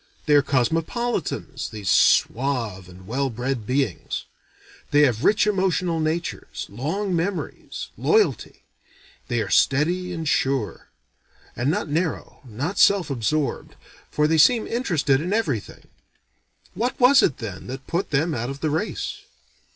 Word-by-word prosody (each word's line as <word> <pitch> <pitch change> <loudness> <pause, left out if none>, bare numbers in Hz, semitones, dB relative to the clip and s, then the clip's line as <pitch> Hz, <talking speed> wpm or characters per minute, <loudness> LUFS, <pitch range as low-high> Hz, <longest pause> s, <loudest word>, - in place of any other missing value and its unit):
They 150 - +3
are 145 - +7
cosmopolitans, 165 - -1
these 105 -3 -8
suave 115 -8 +2
and 90 +1 -14
well 135 +6 -1
bred 125 -1 -3
beings. 130 -7 -2 0.6
They 145 - +4
have 125 -4 +2
rich 210 +2 +4
emotional 185 -4 +1
natures, 160 +2 -3
long 175 - -2
memories, 180 +3 -4
loyalty; 430 0 +1 0.6
they 120 -2 0
are 100 - -7
steady 175 +6 +2
and 165 -3 -4
sure; 135 -7 -1 0.7
and 120 +3 0
not 160 - -1
narrow, 160 +3 -3
not 135 - -4
self 195 -7 +4
absorbed, 135 +2 -2 0.3
for 150 - +1
they 160 0 +2
seem 225 +8 +5
interested 160 - +1
in 180 +5 -2
everything. 145 - -2 0.9
What 245 +3 -2
was 265 +2 +7
it 140 - +1
then, 100 -5 -7
that 130 +1 -7
put 180 +3 -2
them 155 +3 +1
out 120 -1 -3
of 140 +1 -7
the 155 - 0
race? 180 +8 -3
150 Hz, 135 wpm, -23 LUFS, 125-180 Hz, 0.9 s, are